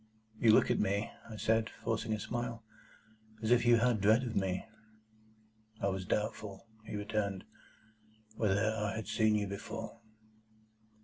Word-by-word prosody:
"You 115 - +6
look 110 - +5
at - - +2
me," 100 +3 0 0.2
I 110 - -7
said, 110 +1 +1
forcing 115 0 -3
a 110 - -2
smile, 120 +1 -4 0.8
"as 110 - +1
if 120 0 +4
you 120 - +8
had 115 0 +3
a - - -6
dread 110 +5 +4
of 120 -2 -4
me." 95 -1 0 1.1
"I 100 - +1
was 95 -1 -3
doubtful," 105 -1 -2 0.2
he - - -6
returned, 105 -2 -2 0.9
"whether 110 0 +2
I 105 -1 -1
had 110 - -5
seen 110 -1 +3
you 105 -1 +1
before." 110 +3 -6
110 Hz, 150 wpm, -33 LUFS, 100-115 Hz, 1.1 s, you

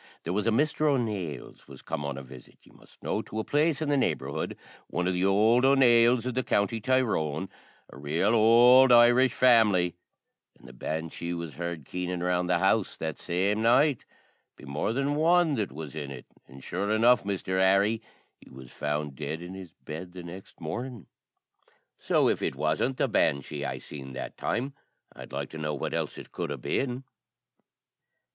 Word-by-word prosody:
There 85 - -3
was 105 +3 -1
a - - +3
Misther 150 +5 +1
O'Nales 105 - -3
was 70 -2 -13
come 70 - -4
on 70 -1 -4
a 70 - -7
visit, 65 -1 -14
ye - - -20
must - - -21
know, - - -1
to 110 - -9
a - - -1
place 150 +3 +1
in 150 - -2
the 145 - +2
neighbourhood 70 - -2 0.3
one 90 +1 -2
o' - - +2
the 90 +1 0
ould 110 +5 +4
O'Nales 125 -3 +5
iv 125 - -2
the 130 - 0
county 115 -1 0
Tyrone, 95 - 0 0.4
a - - -14
rale 80 +9 0
ould 120 +3 +6
Irish 120 +1 +6
family 105 -8 +4 0.7
an' - - -20
the - - -12
banshee 80 +2 -4
was 85 -3 -6
heard 85 -1 -5
keening 90 +1 -4
round 90 0 0
the 90 - +3
house 95 +3 +1
that 80 -2 -4
same 100 +5 0
night, 130 +4 +3 0.5
be - - -14
more 70 +9 -2
then 140 +4 0
one 165 +1 +3
that 105 -7 -2
was 75 +1 -8
in 75 -3 -5
it; 65 -3 -9 0.2
an' 65 +1 -13
sure 95 +8 -3
enough, 115 +2 +4
Misther 95 -1 -2
Harry, 100 +4 +3 0.4
he - - -18
was 65 -1 -13
found 75 -1 -3
dead 75 +3 -5
in 90 +2 -8
his 95 -4 -10
bed 90 +4 -7
the 90 -1 -9
next 90 +3 -11
mornin'. 120 +6 -6 0.9
So - - +2
if - - 0
it - - -2
wasn't 80 +12 -1
the - - +1
banshee 70 +1 0
I - - -3
seen 65 -2 -9
that 65 - -6
time, 135 +4 -2 0.4
I'd - - -11
like 70 0 -5
to 80 - -8
know 75 -1 -2
what 70 - -4
else - - -3
it - - -11
could - - -4
a' - - -4
been." 130 -1 -2
95 Hz, 185 wpm, -27 LUFS, 80-120 Hz, 0.9 s, ould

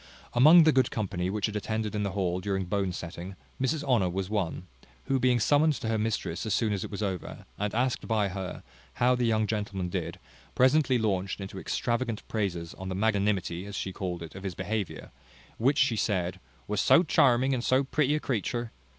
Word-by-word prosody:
Among 155 +8 +8
the 155 - +5
good 130 -4 +3
company 95 -4 -2
which 105 0 -1
had 105 - -3
attended 110 +1 -2
in 105 - -1
the 100 -2 -2
hall 90 -2 0
during 95 0 -1
the - - -9
bone 100 -1 0
setting, 90 +2 -7 0.3
Mrs 140 +3 0
Honour 120 -10 +2
was 95 +2 -3
one; 95 -4 -2 0.4
who 135 -1 0
being 125 -1 +3
summoned 150 +6 +4
to 115 - -5
her 110 -1 +1
mistress 110 0 -2
as 110 -3 0
soon 110 -3 +1
as 100 - -2
it - - -6
was 105 +1 -4
over, 95 -3 -4
and 105 +1 -2
asked 125 +1 0
by 105 -3 +1
her 95 -1 -6 0.3
how 125 +1 +3
the 125 -1 +1
young 110 -1 +2
gentleman 100 -4 -3
did, - - -3 0.4
presently 130 0 +4
launched 100 -4 -1
into 95 -1 -6
extravagant 120 0 -2
praises 90 -6 -2
on 95 0 -5
the 95 - -3
magnanimity, 100 -3 0
as 100 - -7
she 95 0 -3
called 90 -4 -4
it, 80 - -9
of 95 - -9
his 95 -2 -5
behaviour, 100 0 -4 0.5
which, 135 +5 +3
she 130 -5 +3
said, 95 -4 -1 0.3
"was 105 -1 0
so 170 - +6
charming 130 -4 +3
in 130 -2 0
so 130 +2 +2
pretty 145 +1 +1
a - - 0
creature." 120 -2 -2
105 Hz, 205 wpm, -28 LUFS, 95-125 Hz, 0.5 s, Among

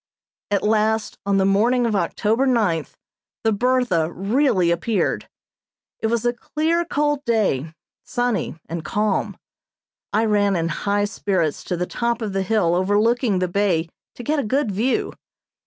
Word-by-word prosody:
At 200 -1 0
last, 220 +1 +1
on 200 -1 +3
the 190 - +3
morning 235 +6 +3
of 225 -2 0
October 215 +7 +1
ninth, 205 - 0 0.5
the 225 - +3
"Bertha" 215 -8 +1
really 195 - +2
appeared. 200 +4 -1 0.7
It 220 - 0
was 235 +1 0
a 240 - +2
clear, 320 +7 -1
cold 295 -2 0
day, 195 - 0 0.3
sunny 245 -10 -1
and 165 0 -5
calm. 210 -1 -1 0.7
I 220 +2 +2
ran 205 -2 +2
in 165 -1 0
high 205 +5 0
spirits 185 -7 -1
to 180 - -2
the 180 - -1
top 235 +3 -2
of 205 -3 -3
the 195 - 0
hill 190 -3 +1
overlooking 205 +4 +2
the 185 0 0
bay 175 -3 0 0.3
to 245 - -8
get 300 +5 0
a - - 0
good 255 +1 0
view. 225 +7 0
210 Hz, 155 wpm, -22 LUFS, 190-240 Hz, 0.7 s, on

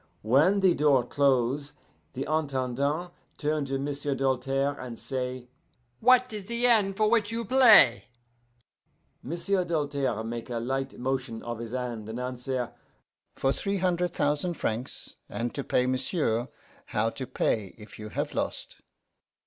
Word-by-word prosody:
"When 150 - +4
the 185 -2 +5
door 140 -4 +3
close, 140 +1 +1 0.4
the 135 +1 -3
Intendant 145 +2 -1 0.3
turn 150 -1 0
to 135 0 -2
M'sieu' 140 0 -2
Doltaire 135 +1 0
and 125 -2 -7
say, 130 -2 -4 0.5
'What 255 0 +4
is 210 -3 -6
the 235 +3 -1
end 205 -5 +3
for 215 - +3
which 220 -1 +2
you 230 0 -3
play?' 225 - +7 1.2
M'sieu' 180 +6 -1
Doltaire 145 -8 -1
make 115 +2 -5
a 120 - -2
light 135 +3 -3
motion 130 -2 -3
of 120 -1 -5
his 115 -1 -5
hand, 120 -4 -4
and 115 +2 -5
answer, 125 0 -3 0.6
'For 135 - +1
three 200 +7 -2
hunder' 180 -1 +1
thousan' 150 +1 -1
francs.' 115 -2 -4
'And 120 +1 -3
to 140 - -3
pay, 125 - +1
m'sieu', 130 -2 0 0.4
how 110 +2 0
to 130 +1 -6
pay 105 -4 -1
if 105 0 -13
you 105 0 -7
have - - -3
lost? - - -4
135 Hz, 145 wpm, -28 LUFS, 125-175 Hz, 1.2 s, play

